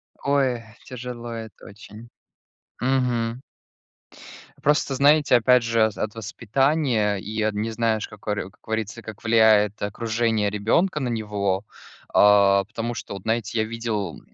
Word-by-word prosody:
Ой, 135 Hz, -4 st, 0 dB, 0.2 s
тяжело 125 Hz, -1 st, -7 dB
это 110 Hz, -1 st, -9 dB
очень. 105 Hz, +3 st, -13 dB, 0.7 s
Мгм. 125 Hz, -2 st, 0 dB, 1.2 s
Просто 145 Hz, -1 st, +1 dB
знаете, 145 Hz, 0 st, +4 dB
опять 125 Hz, +1 st, +5 dB
же, 115 Hz, -1 st, +2 dB
а, -, -, +3 dB
от 110 Hz, +1 st, -5 dB
воспитания 115 Hz, -, 0 dB
и 110 Hz, +3 st, -4 dB
от 110 Hz, 0 st, 0 dB
не 105 Hz, +2 st, -2 dB
знаешь, 110 Hz, -1 st, 0 dB
как 105 Hz, 0 st, -16 dB
оре 105 Hz, -2 st, -2 dB
как 100 Hz, -, -27 dB
говорится, 110 Hz, +1 st, -4 dB
как 110 Hz, -2 st, -10 dB
влияет 110 Hz, -2 st, +4 dB
окружение 110 Hz, 0 st, 0 dB
ребенка 115 Hz, -, +1 dB
на 130 Hz, -4 st, -2 dB
него. 105 Hz, -4 st, -1 dB, 0.5 s
А, 100 Hz, -1 st, +5 dB
потому 115 Hz, +3 st, -5 dB
что, -, -, -7 dB
вот 100 Hz, -, -7 dB
знаете, 115 Hz, 0 st, -1 dB
я -, -, +3 dB
видел, 110 Hz, -5 st, -4 dB
115 Hz, 140 wpm, -23 LUFS, 105-120 Hz, 1.2 s, опять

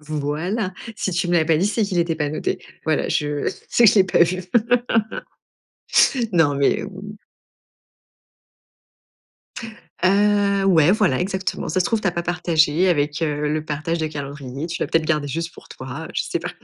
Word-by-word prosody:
Voilà. 155 Hz, +7 st, -3 dB, 0.2 s
Si 190 Hz, -, -2 dB
tu 175 Hz, 0 st, -1 dB
me 175 Hz, -, +1 dB
l'as 160 Hz, -2 st, +3 dB
pas 160 Hz, -1 st, +2 dB
dit, 185 Hz, +5 st, +1 dB
c'est 215 Hz, +1 st, 0 dB
qu'il 190 Hz, -3 st, -1 dB
était 170 Hz, -1 st, +1 dB
pas 150 Hz, -2 st, -1 dB
noté. 155 Hz, -, -2 dB, 0.3 s
Voilà, 155 Hz, -2 st, 0 dB
je 145 Hz, -1 st, -1 dB, 0.2 s
sais 240 Hz, -, +3 dB
que 210 Hz, -, +9 dB
je -, -, 0 dB
l'ai 195 Hz, -, +6 dB
pas 185 Hz, -, +3 dB
vu. 185 Hz, +2 st, 0 dB, 1.9 s
Non, 155 Hz, -5 st, +3 dB
mais 140 Hz, 0 st, +1 dB
ou 195 Hz, -1 st, -9 dB, 3.0 s
Heu, 200 Hz, 0 st, +3 dB
ouais, 170 Hz, -3 st, +5 dB
voilà 195 Hz, -11 st, +2 dB
exactement. 190 Hz, 0 st, -3 dB
«Ça 185 Hz, -, 0 dB
se 180 Hz, -, +1 dB
trouve, 225 Hz, -3 st, 0 dB
tu -, -, 0 dB
as -, -, +1 dB
pas 170 Hz, 0 st, -3 dB
partagé 175 Hz, 0 st, +2 dB
avec, 150 Hz, -1 st, 0 dB
heu, 150 Hz, -1 st, -1 dB
le 155 Hz, +1 st, -1 dB
partage 155 Hz, +3 st, -3 dB
de 155 Hz, -, -1 dB
calendrier, 140 Hz, -1 st, -6 dB
tu 170 Hz, -, -5 dB
l'as -, -, 0 dB
peut-être 165 Hz, -1 st, +1 dB
garder 150 Hz, -3 st, 0 dB
juste 165 Hz, +4 st, -4 dB
pour -, -, -15 dB
toi, 130 Hz, +5 st, -7 dB
je -, -, 0 dB
sais -, -, -3 dB
pas». -, -, -5 dB
165 Hz, 180 wpm, -21 LUFS, 150-185 Hz, 3.0 s, que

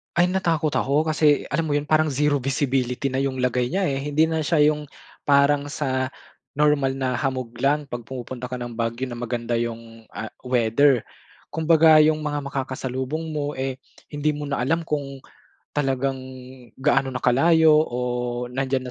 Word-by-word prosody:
Ay, 175 Hz, +1 st, +3 dB
natakot 170 Hz, -5 st, 0 dB
ako 145 Hz, +4 st, +1 dB
kasi 150 Hz, -2 st, +3 dB
alam 165 Hz, -1 st, 0 dB
mo 145 Hz, -, 0 dB
'yun, 145 Hz, -, 0 dB
parang 155 Hz, +1 st, +2 dB
zero 145 Hz, 0 st, +1 dB
visibility 130 Hz, 0 st, -1 dB
na 130 Hz, -, -1 dB
'yung 135 Hz, -1 st, -1 dB
lagay 125 Hz, -1 st, +1 dB
niya, 190 Hz, +6 st, -1 dB
eh, 135 Hz, -5 st, 0 dB
hindi 150 Hz, +2 st, +1 dB
na 160 Hz, 0 st, 0 dB
siya 155 Hz, 0 st, +2 dB
'yung 150 Hz, -1 st, -6 dB, 0.4 s
parang 140 Hz, 0 st, +4 dB
sa 130 Hz, -3 st, -1 dB, 0.5 s
normal 145 Hz, -2 st, +2 dB
na 130 Hz, -2 st, -1 dB
hamog 130 Hz, -3 st, -2 dB
lang 145 Hz, +3 st, +2 dB
'pag 120 Hz, -4 st, -8 dB
pumupunta 125 Hz, -1 st, -6 dB
ka 125 Hz, -, -5 dB
ng 120 Hz, -1 st, -7 dB
Baguio 115 Hz, +2 st, -2 dB
na 120 Hz, -, -6 dB
maganda 120 Hz, -1 st, -2 dB
'yung, 115 Hz, -1 st, -6 dB
ah, 110 Hz, -, -5 dB
weather. 125 Hz, 0 st, +2 dB, 0.5 s
Kumbaga 160 Hz, 0 st, +5 dB
'yung 155 Hz, 0 st, +3 dB
mga 145 Hz, -1 st, -2 dB
makakasalubong 130 Hz, +3 st, -3 dB
mo, 145 Hz, 0 st, -2 dB
eh, 130 Hz, -1 st, -2 dB, 0.3 s
hindi 150 Hz, +1 st, -1 dB
mo 145 Hz, -1 st, -5 dB
na 140 Hz, -3 st, -1 dB
alam 165 Hz, +4 st, 0 dB
kung 140 Hz, -2 st, -3 dB, 0.5 s
talagang 135 Hz, -2 st, -1 dB, 0.6 s
gaano 135 Hz, 0 st, +1 dB
na -, -, -4 dB
kalayo 155 Hz, +4 st, +5 dB
o 120 Hz, -, -5 dB, 0.5 s
nandiyan 130 Hz, -1 st, -2 dB
135 Hz, 165 wpm, -23 LUFS, 125-150 Hz, 0.6 s, Kumbaga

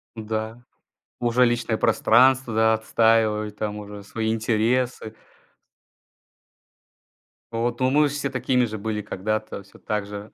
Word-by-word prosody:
М-да. 110 Hz, +1 st, -5 dB, 0.6 s
Уже 120 Hz, +1 st, +3 dB
личное 120 Hz, -2 st, 0 dB
пространство, 130 Hz, +3 st, +3 dB
да, 110 Hz, 0 st, +4 dB
отстаивают 110 Hz, -2 st, +1 dB
там 105 Hz, -1 st, -3 dB
уже 105 Hz, 0 st, -9 dB
свои 110 Hz, +2 st, -2 dB
интересы. 115 Hz, +1 st, 0 dB, 2.4 s
Вот, 120 Hz, +1 st, -2 dB
но 130 Hz, 0 st, +2 dB
мы 150 Hz, +2 st, +4 dB
же 140 Hz, -, -5 dB
все 145 Hz, -1 st, -2 dB
такими 125 Hz, -1 st, +1 dB
же 110 Hz, -1 st, -5 dB
были 105 Hz, 0 st, -3 dB
когда-то, 110 Hz, +1 st, -4 dB
всё 100 Hz, -, -19 dB
так 105 Hz, -1 st, -3 dB
же. 100 Hz, +1 st, -9 dB
110 Hz, 130 wpm, -23 LUFS, 110-120 Hz, 2.4 s, да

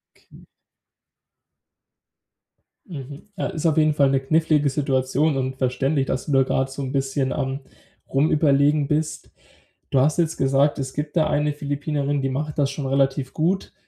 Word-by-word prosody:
Okay. -, -, -19 dB, 2.4 s
Mhm. 145 Hz, 0 st, -9 dB
Äh, -, -, -3 dB
ist 160 Hz, +1 st, -4 dB
auf 160 Hz, -1 st, +2 dB
jeden 155 Hz, -1 st, +4 dB
Fall 140 Hz, -2 st, +3 dB
'ne 135 Hz, -, +2 dB
knifflige 150 Hz, +1 st, +2 dB
Situation 135 Hz, +1 st, 0 dB
und 130 Hz, 0 st, -2 dB
verständlich, 135 Hz, +2 st, 0 dB
dass 130 Hz, -, -3 dB
du 150 Hz, -, -4 dB
da 135 Hz, 0 st, +5 dB
grad 135 Hz, +1 st, -1 dB
so 140 Hz, +1 st, -6 dB
'n 130 Hz, -, -4 dB
bisschen 135 Hz, -1 st, -1 dB
am 135 Hz, -2 st, -2 dB, 0.5 s
Rumüberlegen 145 Hz, 0 st, +3 dB
bist. 155 Hz, +1 st, -2 dB, 0.6 s
Du 135 Hz, -, +2 dB
hast 145 Hz, +4 st, +2 dB
jetzt 165 Hz, -2 st, 0 dB
gesagt, 135 Hz, +2 st, +2 dB
es 130 Hz, -1 st, -4 dB
gibt 150 Hz, +2 st, -4 dB
da 155 Hz, -, +3 dB
eine 150 Hz, 0 st, 0 dB
Philippinerin, 145 Hz, 0 st, -2 dB
die 135 Hz, -, -1 dB
macht 150 Hz, +3 st, -3 dB
das 140 Hz, -1 st, +2 dB
schon 140 Hz, 0 st, -5 dB
relativ 135 Hz, 0 st, 0 dB
gut. 180 Hz, +5 st, -1 dB
140 Hz, 160 wpm, -23 LUFS, 135-150 Hz, 2.4 s, da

